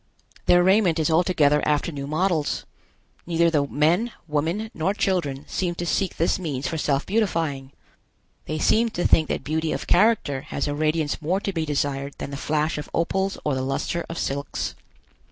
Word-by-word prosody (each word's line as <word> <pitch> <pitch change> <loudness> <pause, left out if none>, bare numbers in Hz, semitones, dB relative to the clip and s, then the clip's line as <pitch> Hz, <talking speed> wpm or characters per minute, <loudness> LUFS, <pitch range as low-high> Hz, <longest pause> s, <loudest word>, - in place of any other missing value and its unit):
Their 175 0 +6
raiment 190 -3 +4
is 160 0 +1
altogether 160 -4 +3
after 150 +2 +1
new 140 -2 -5
models. 160 0 0 0.6
Neither 170 0 +3
the 145 -3 +2
men, 170 +12 +2 0.2
women, 165 +9 -1
nor 190 +6 -1
children 150 -10 -1
seem 175 -2 -2
to 175 - -4
seek 180 +3 -1
this 165 +3 +1
means 145 -7 -3
for 160 - -3
self 140 -2 0
beautifying. 165 -10 -1 0.8
They 155 - -2
seem 225 +8 +3
to 175 - 0
think 155 - +4
that - - -2
beauty 160 +1 -1
of - - -3
character 180 -9 +3
has 140 - -2
a 145 - -1
radiance 155 +1 0
more 175 +5 0
to 200 - -3
be 160 -2 -2
desired 140 -1 -2
than 140 - -6
the - - -4
flash 150 +1 0
of 150 - -7
opals 190 +3 0
or 150 - +1
the 130 - -1
luster 135 +6 -2
of 165 - -5
silks. 140 +1 -3
160 Hz, 180 wpm, -24 LUFS, 145-180 Hz, 0.8 s, Their